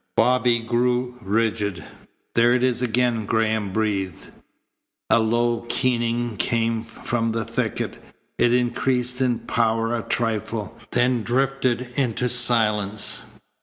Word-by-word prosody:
Bobby 125 -1 +3
grew 125 +2 0
rigid. 105 -4 -1 0.5
"There 120 +1 +4
it 125 0 +1
is 125 -1 +1
again," 120 -2 0
Graham 110 -2 0
breathed. 100 -4 -2 0.8
A - - +6
low 120 +1 +1
keening 120 -2 0
came 115 +1 0
from 115 0 -2
the 115 -1 -2
thicket. - - -3 0.4
It 120 - +4
increased 125 +1 0
in 125 -2 +2
power 115 0 0
a 115 - -2
trifle, 115 -1 -2
then 120 0 +2
drifted 130 +1 0 0.2
into 125 -2 0
silence. 105 -4 +2
115 Hz, 115 wpm, -23 LUFS, 110-125 Hz, 0.8 s, A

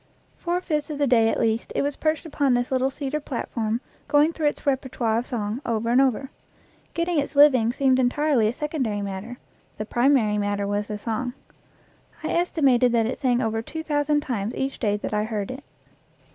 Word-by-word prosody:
Four 350 +1 -2
fifths 300 -4 -2
of 300 - -4
the 290 - +2
day 230 -4 +4
at - - -1
least 225 0 0
it - - +1
was 285 0 -1
perched 310 0 -1
upon 285 -4 +1
this 245 +1 -1
little 260 0 +2
cedar 280 +2 -3
platform, 235 -4 -3 0.3
going 295 +3 +4
through 310 -3 0
its 295 - -3
repertoire 260 -5 0
of 245 - -6
song, 220 0 -3
over 230 0 -1
and 250 +2 +5
over. 270 +1 0 0.6
Getting 335 -1 +1
its 285 - -3
living 260 -6 +6
seemed 260 0 +2
entirely 260 -2 +2
a 220 - 0
secondary 265 -10 -2
matter; 200 +5 -6 0.4
the 215 - -4
primary 240 -3 +2
matter 205 0 -1
was 205 +1 -1
the 210 - -4
song. 240 +4 -3 0.9
I - - -2
estimated 275 -8 +3
that 230 -1 +3
it 240 - -3
sang 250 -2 +1
over 225 0 -1
two 320 +7 -6
thousand 295 -1 +1
times 230 -6 -3
each 270 0 -3
day 210 -3 +1
that 210 - -5
I 210 0 +1
heard 215 -1 -3
it. 265 +2 -8
255 Hz, 195 wpm, -24 LUFS, 225-290 Hz, 0.9 s, living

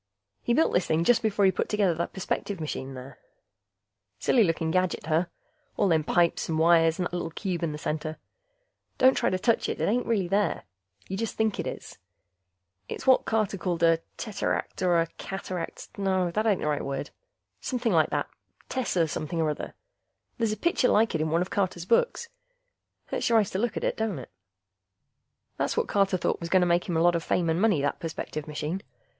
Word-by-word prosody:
He 235 - +1
built 320 - +3
this 180 - +2
thing 160 +1 +2
just 240 +7 +4
before 210 -2 +2
he 190 - +5
put - - -2
together 205 -4 +2
the 170 +1 -2
perspective 190 0 -3
machine 135 -4 -5
there. 130 +1 -10 1.0
Silly 235 - +3
looking 165 -3 0
gadget, 185 -2 0
huh? 160 +3 +2 0.5
All 205 - +3
them 160 -2 +3
pipes 170 +2 +1
and 160 - 0
wires 165 0 +4
and 180 - -1
that 175 - -5
little 175 -2 -2
cube 180 +1 -3
in 165 -2 -1
the 150 - -5
center... 155 +1 -3 0.8
don't 260 +1 +6
try - - +1
to 185 - 0
touch 230 +4 +1
it, - - -3
it - - +1
ain't 240 +4 +1
really 205 -6 +1
there. 200 +3 0 0.4
You 190 - -4
just 225 +1 -3
think 220 -2 0
it - - -2
is. - - -7 0.9
It's - - -6
what 260 -1 +5
Carter 215 -3 0
called 170 -1 -1
a 165 -1 +5 0.2
teteract, 215 -3 -3
or 175 -2 +3
a - - +1
cataract... 185 -2 -5
no, 190 -3 +1
that 215 +5 0
ain't 205 -3 +2
the - - -1
right 150 -1 0
word. 140 +1 -4 0.5
Somepin' 245 -3 -1
like 160 -4 +3
that - - -1 0.4
tesser 185 -10 +1
something 155 +2 -3
or 155 -2 +2
other. 150 - -6 0.6
There's 225 -2 +1
a 215 - -3
picture 340 -7 +2
like 220 0 +3
it 160 - 0
in 155 - 0
one 165 +3 +2
of 180 - -10
Carter's 180 -4 -1
books. 465 - +1 0.8
Hurts - - -1
your 230 - +5
eyes 210 -3 +2
to 190 - -2
look 235 +1 -1
at - - -3
it, - - 0
don't 220 -6 -1
it? 130 - -9 1.3
That's - - -1
what - - +1
Carter 195 -2 +2
thought 170 - -1
was 170 - -5
going 185 0 +4
to - - +4
make 175 +1 +1
him 170 - +1
a - - +2
lot 175 0 +5
of 165 - -1
fame 170 -2 +1
and 165 +3 0
money, 200 -10 +3
that 145 - -1
perspective 155 -2 -5
machine. 150 +5 -3
180 Hz, 210 wpm, -27 LUFS, 160-210 Hz, 1.3 s, don't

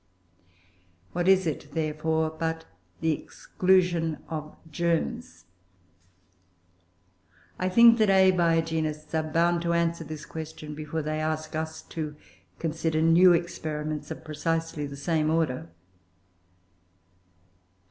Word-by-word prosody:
What 175 +1 -1
is 190 -1 +5
it, 145 -2 -4
therefore, 160 0 0
but 160 0 -3 0.4
the 160 - +2
exclusion 175 0 +1
of 155 -2 -6
germs? 175 +10 -2 2.1
I 185 - 0
think 230 +4 +7
that 215 -2 +4
Abiogenists 165 -5 +2
are 160 - +2
bound 170 +1 +2
to 170 0 0
answer 170 0 0
this 150 -1 -8
question 155 -1 -7
before 155 +1 -4
they 155 +1 -2
ask 155 0 -3
us 160 0 -4
to 155 -2 -5 0.4
consider 160 -1 -1
new 170 +3 +6
experiments 155 -3 -3
of - - -8
precisely 160 -1 -2
the 140 0 -8
same 155 +1 0
order. 155 - 0
160 Hz, 105 wpm, -27 LUFS, 155-170 Hz, 2.1 s, think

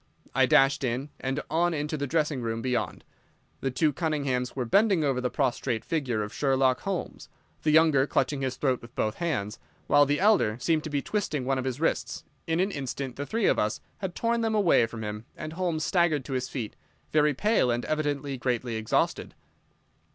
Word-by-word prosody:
I 130 0 +4
dashed 140 -2 +4
in, 130 +3 -2
and 135 +3 -2
on 170 +1 +2
into 150 +1 -2
the 140 -1 -2
dressing 150 -2 0
room 115 -1 -3
beyond. 125 -2 -2 0.6
The 135 - -1
two 145 +4 +1
Cunninghams 140 -6 -1
were 130 -2 -1
bending 195 - +3
over 135 -3 +1
the 125 - 0
prostrate 120 -4 -1
figure 130 -9 -1
of 105 - -7
Sherlock 135 -2 +2
Holmes, 195 -3 -4 0.3
the 155 - +1
younger 155 -3 +5
clutching 135 +1 0
his 130 -1 -1
throat 130 -3 0
with 115 +1 -14
both 110 0 -1
hands, 110 -12 -2 0.3
while 145 -1 +5
the 145 +1 +1
elder 190 - +3
seemed 155 +3 +1
to - - -3
be 145 -2 -1
twisting 155 -11 -2
one 135 0 +1
of 130 - -3
his 130 0 -3
wrists. 165 - -1 0.2
In 165 +1 +1
an 190 +2 +1
instant 135 -3 -4
the 145 +1 -5
three 225 -2 0
of - - +3
us 105 0 0 0.2
had 190 -3 -4
torn 235 0 0
them 225 -1 0
away 175 - +4
from 115 -1 -7
him, 105 +1 -5
and 155 0 -6
Holmes 170 -3 -1
staggered 165 -7 +2
to 135 - -5
his 130 -1 -2
feet, 115 -6 -5 0.4
very 150 -2 +3
pale 210 - +2
and 120 0 0
evidently 145 -3 -2
greatly 120 -2 -1
exhausted. 110 0 -1
140 Hz, 195 wpm, -27 LUFS, 125-160 Hz, 0.6 s, younger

